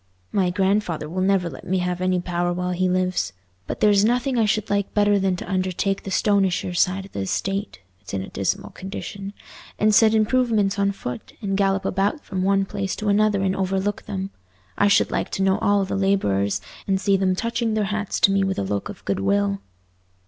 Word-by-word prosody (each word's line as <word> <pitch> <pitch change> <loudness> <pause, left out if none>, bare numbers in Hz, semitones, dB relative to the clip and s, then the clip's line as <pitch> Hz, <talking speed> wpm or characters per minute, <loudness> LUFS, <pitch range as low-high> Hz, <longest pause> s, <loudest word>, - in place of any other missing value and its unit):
My 185 -2 +2
grandfather 190 -4 0
will 180 +4 -3
never 190 -2 +2
let 140 -6 -8
me 190 - +1
have 180 0 -2
any 185 0 +1
power 175 0 -1
while 180 +1 -2
he 185 +1 +1
lives, 180 - 0 0.3
but - - -5
there's 205 -1 +5
nothing 250 +4 +1
I 230 -2 +3
should 215 0 0
like 200 -1 -1
better 205 -1 +4
than 190 -1 +1
to - - -7
undertake 190 +1 -1
the - - -7
Stonyshire 190 -2 +1
side 185 +2 +1
of 195 - -15
the - - -5
estate—it's 95 - -4
in 95 -1 -2
a - - -9
dismal 100 - -2
condition—and 200 +2 -4
set 220 +1 +5
improvements 215 -3 +2
on 200 0 +2
foot, 125 -11 -7
and 195 -3 -2
gallop 195 0 +1
about 200 - 0
from 185 - -3
one 195 +1 +2
place 195 -1 -3
to 210 -1 -2
another 205 -1 +3
and 190 0 +1
overlook 195 +1 -1
them. 195 -1 -4 0.4
I 205 - +3
should 200 - +3
like - - -1
to 195 - 0
know 190 0 +2
all 200 -1 +2
the 190 - -3
labourers, 100 - +1 0.3
and 190 -1 +1
see 200 0 +2
them 190 -1 +1
touching 230 +1 -1
their 215 - +1
hats 210 -1 -2
to 195 - +6
me 195 0 +2
with 190 0 -1
a - - 0
look 100 +1 -3
of - - -10
goodwill." 100 0 0
195 Hz, 200 wpm, -23 LUFS, 180-205 Hz, 0.4 s, to